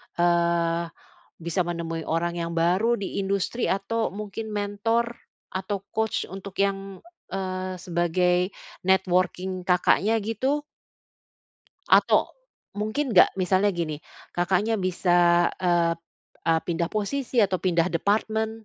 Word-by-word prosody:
eee, 170 -1 +2 0.6
bisa 170 +2 -2
menemui 165 -1 -4
orang 170 +2 -1
yang 170 -1 -3
baru 190 +8 +2
di 200 0 -3
industri 200 +5 -1
atau 220 +4 -1
mungkin 210 +2 -6
mentor 210 +3 -1 0.4
atau 190 +2 -2 0.2
coach 220 -1 0
untuk 195 +1 -9
yang, 195 -1 -1 0.3
eee, 185 -1 -3
sebagai 180 +1 +1 0.3
networking 185 0 +1
Kakaknya 190 +4 +3
gitu. 255 +7 -1 1.3
Atau - - +4 0.4
mungkin 215 +6 -2
nggak 180 - +6
misalnya 190 +2 +2
gini 155 -3 -3 0.3
Kakaknya 195 +5 +1
bisa, 175 -1 +3
eee 175 -2 +2
p - - -33 0.5
eee, 165 0 +4
pindah 170 -1 -1
posisi 240 +4 0
atau 195 -3 +3
pindah 175 -2 +2
departmen 220 +4 0
185 Hz, 115 wpm, -25 LUFS, 175-210 Hz, 1.3 s, nggak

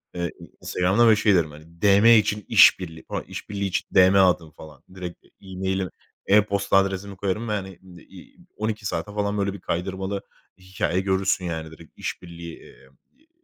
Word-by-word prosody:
Eee, 85 -1 -2 0.3
Instagram'da 95 +6 +2
ve 110 - +6
şey 105 -1 +3
derim 80 -4 +1
hani, 80 +3 -16
DM 100 +1 +5
için 105 -1 0
iş - - +7
birliği 80 -3 -8
falan, - - -3
iş - - -9
birliği 100 -1 -3
için 95 - -2
DM 95 0 +6
atın 90 -4 +2
falan. 75 -2 -14
Direkt 90 -2 -8 0.2
e-mail'i, 95 -1 -3 0.4
e-posta 100 -1 +3
adresimi 100 0 -1
koyarım 100 +4 -2
ve - - 0
hani, 95 -3 -5 0.3
iii, 95 -2 -15 0.2
12 110 -1 -3
saate 105 +1 -3
falan 105 0 -1
böyle 100 -1 -1
bir 100 - -10
kaydırmalı 95 +3 -3 0.4
hikâye 95 -1 -2
görürsün 95 -1 0
yani 80 -2 -5
direkt 80 0 -15
iş - - -5
birliği, 85 -1 -9
eee, 65 - -18 0.3
iii, 315 +3 -33
95 Hz, 175 wpm, -24 LUFS, 85-100 Hz, 0.4 s, iş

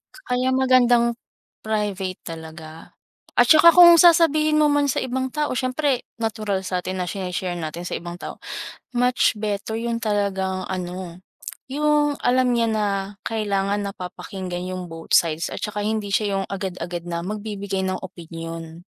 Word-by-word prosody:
Kaya 255 - -1
magandang 245 -2 +4 0.5
private 205 -4 -2 0.2
talaga. 160 0 -11 0.4
At 245 - +7
saka 315 +2 +9
kung 345 -1 +9
sasabihin 310 -3 +5
mo 305 - +5
man 290 -1 +2
sa - - -1
ibang 260 +1 -2
tao, 300 +1 -1
siyempre 255 +1 0 0.2
natural 215 -4 -2
sa'tin 185 0 -3
na 180 - -1
shini-share 180 0 -3
natin 165 +2 -5
sa - - -4
ibang 175 +1 -7
tao. - - -8 0.6
Much 250 0 +3
better 210 +1 -3
'yung 230 0 -2
talagang 195 -3 -1
ano, 180 -1 -5 0.5
'yung 295 +1 +2
alam 255 +1 +3
niya 230 -1 +2
na 215 -1 0 0.4
kailangan 205 -2 0
napapakinggan 180 -1 -6
yung 185 -1 -5
both 165 0 -8
sides 165 -1 +1
at - - -4
saka 210 -1 -3
hindi 215 -1 -1
siya 200 -1 +1
yung - - -2
agad-agad 180 -3 -5
na 170 -1 -2
magbibigay 200 -1 -4
ng 185 0 -1
opinyon. 165 -2 -8
205 Hz, 145 wpm, -23 LUFS, 180-250 Hz, 0.6 s, saka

